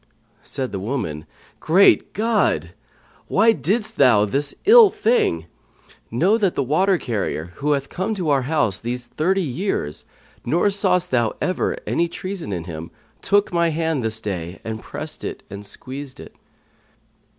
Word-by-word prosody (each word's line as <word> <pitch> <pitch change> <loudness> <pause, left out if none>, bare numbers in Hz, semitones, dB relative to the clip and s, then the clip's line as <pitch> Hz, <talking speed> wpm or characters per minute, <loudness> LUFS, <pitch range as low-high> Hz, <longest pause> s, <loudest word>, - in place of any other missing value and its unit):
Said 130 -5 -4
the 100 - -4
woman, 95 - -4 0.3
"Great 185 +5 +4
God! 205 - +1 0.6
Why 220 +4 +4
didst 210 - -1
thou 120 -7 +5
this 140 +7 -2
ill 450 0 +9
thing? 210 - +1 0.6
Know 185 - +2
that 195 -5 +1
the - - +1
water 185 +8 +2
carrier, 100 - -3
who 145 +1 +1
hath 140 -1 -2
come 190 +8 -3
to 180 -6 -2
our 140 -2 +3
house 135 - 0
these 120 +1 -4
thirty 185 +9 0
years, 145 - -3 0.4
nor 175 +10 +2
sawst 180 -3 +1
thou 120 -3 +1
ever 185 - -1
any 170 - +1
treason 185 - -6
in 90 -3 -3
him 85 -1 -7 0.3
took 205 -2 +2
my 170 -1 +3
hand 160 -4 -1
this 110 0 -2
day 90 -5 -5
and 110 0 -5
pressed - - -7
and 100 +1 -7
squeezed 135 +5 -8
it." - - -12
145 Hz, 150 wpm, -21 LUFS, -, 0.6 s, ill